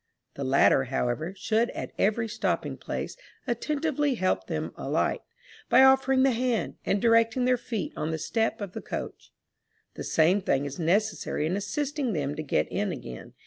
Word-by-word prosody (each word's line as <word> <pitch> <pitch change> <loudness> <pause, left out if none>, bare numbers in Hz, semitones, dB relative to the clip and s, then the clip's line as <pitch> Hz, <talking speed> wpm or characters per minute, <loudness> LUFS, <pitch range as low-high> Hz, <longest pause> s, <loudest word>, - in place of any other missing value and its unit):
The 140 - -5
latter, 135 0 +4
however, 135 +7 -2
should 220 +4 +1
at - - -5
every 220 +3 +2
stopping 215 - -2
place, - - -5 0.3
attentively 290 +2 0
help 185 -4 0
them - - -3
alight, - - -1 0.5
by 260 - +7
offering 265 0 +5
the 270 - +4
hand, 245 -1 -1
and 200 - +1
directing 230 +2 +3
their 255 0 +4
feet 235 -3 -4
on 155 - -2
the 160 - -1
step 225 +8 -1
of 200 -3 -4
the - - -6
coach. - - -6 0.6
The - - -6
same 175 +5 +3
thing 140 -6 +1
is 140 +2 -6
necessary 190 -1 0
in 170 +4 0
assisting 265 +5 -2
them 145 -3 -1
to 155 - -4
get 150 - 0
in 200 -1 -1
again. 95 - -8
210 Hz, 170 wpm, -27 LUFS, 160-250 Hz, 0.6 s, by